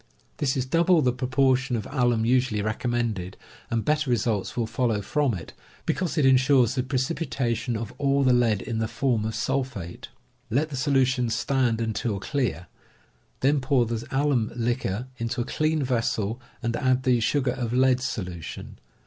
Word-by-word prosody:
This 135 -2 0
is 130 - 0
double 170 +3 +3
the 125 -1 +2
proportion 130 +1 +1
of 110 -3 -3
alum 120 -5 +2
usually 125 -4 +2
recommended, 110 -4 -2 0.3
and 115 -1 -1
better 150 -2 +1
results 115 -4 0
will 120 - +1
follow 115 -2 0
from 130 +4 0
it, 85 - -9 0.3
because 180 -4 -1
it 150 - +3
insures 130 -2 +4
the 130 - 0
precipitation 130 -3 -1
of 110 -1 -6
all 140 -1 +2
the 130 -1 +4
lead 115 -5 +2
in 115 -3 -3
the 110 - 0
form 115 -1 0
of 110 -1 -3
sul 135 +4 0
phate. 100 -10 -8 0.4
Let 140 +7 +1
the 140 - -5
solutions 130 -4 +1
stand 125 -3 +1
until 110 -2 -2
clear; 130 -7 -2 0.8
then 140 +1 +3
pour 130 -2 +2
the 115 0 -3
alum 135 -5 +1
liquor 120 -2 -1
into 115 +2 -2
a 120 - 0
clean 155 -1 0
vessel, 115 -2 -1 0.2
and 115 0 0
add 130 -2 +1
the 125 -2 +3
sugar 130 +3 +1
of 120 -3 -3
lead 130 0 +3
solution. 90 - -5
125 Hz, 165 wpm, -25 LUFS, 115-135 Hz, 0.8 s, insures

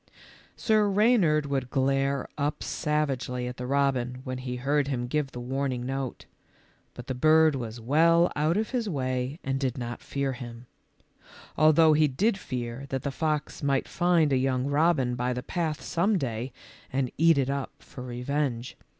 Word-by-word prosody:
Sir 215 -2 +2
Reynard 195 -8 +3
would 135 -3 -2
glare 135 0 +1
up 145 0 -2
savagely 140 -5 -1
at 125 0 -5
the 125 - -5
robin 135 -3 +1
w 125 +1 -11
r 130 - -4
hen 130 - -3
he 125 -1 -4
heard 140 +3 0
him 125 -3 -2
give 140 +2 -1
the 125 - -7
warning 130 0 -2
note, 135 -1 -4 0.7
but 125 - -8
the 130 - -3
bird 155 +4 +5
was 120 -3 -5
well 165 +8 +4
out 155 +5 +1
of 220 0 -1
his 240 -5 -1
way 130 -2 -2
and 135 0 -1
did 130 -2 -1
not 120 -1 -5
fear 140 -1 -2
him; 120 -1 -9 0.9
although 155 +1 +5
he 155 0 +4
did 195 - +1
fear 125 -6 -5
that 135 -1 -3
the 140 - -2
fox 150 0 -2
might 140 -2 +1
find 170 -4 +2
a - - +4
young 130 0 0
robin 145 -3 +2
by 125 +1 -1
the 125 0 -4
path 160 -1 -2
some 195 +5 +1
day 125 -3 -3 0.4
and 130 -1 -1
eat 165 -1 +5
it 135 -1 +1
up 140 -1 -2
for 125 - -12
revenge. 125 0 -2
135 Hz, 175 wpm, -27 LUFS, 125-155 Hz, 0.9 s, bird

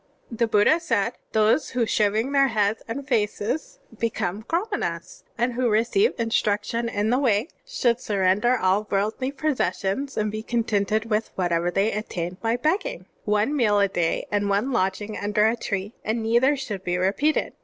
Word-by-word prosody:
*' - - -39
(3) 230 - -8
The 235 - +2
Buddha 220 +9 +4
said: 230 - 0 0.2
"Those 220 +7 +2
who 245 -2 0
shaving 215 +4 +1
their 275 -1 +4
heads 215 -2 0
and 270 +4 -5
faces 210 +6 -1 0.2
become 210 -3 -2
Qramanas 410 - -3 0.2
and 240 +1 0
who 245 0 +1
receive 235 - +2
instruction 230 0 0
in 210 +1 0
the 250 - +3
Way, 235 - +1 0.2
should 250 - +1
sturender 210 +2 +1
all 195 +2 +1
worldly 215 +7 -1
possessions 275 - -1
and 215 -1 0
be 215 +1 -4
contented 220 -1 0
with 215 +1 0
whatever 175 -1 0
they 195 +5 +1
obtain 180 -4 -4
by 230 +1 +1
begging.' 385 - -1 0.2
One 210 +7 +1
meal 215 -7 +3
a 200 - +4
day 175 -3 -1
and 205 -1 0
one 205 +7 +1
lodging 205 -1 -1
under 210 +1 +1
a 225 - +1
tree, 205 -2 -4
and 225 +1 -1
neither 240 +6 +3
should 215 -8 -5
be 180 -1 -1
repeated. 210 +12 +1
220 Hz, 170 wpm, -24 LUFS, 205-250 Hz, 0.2 s, Buddha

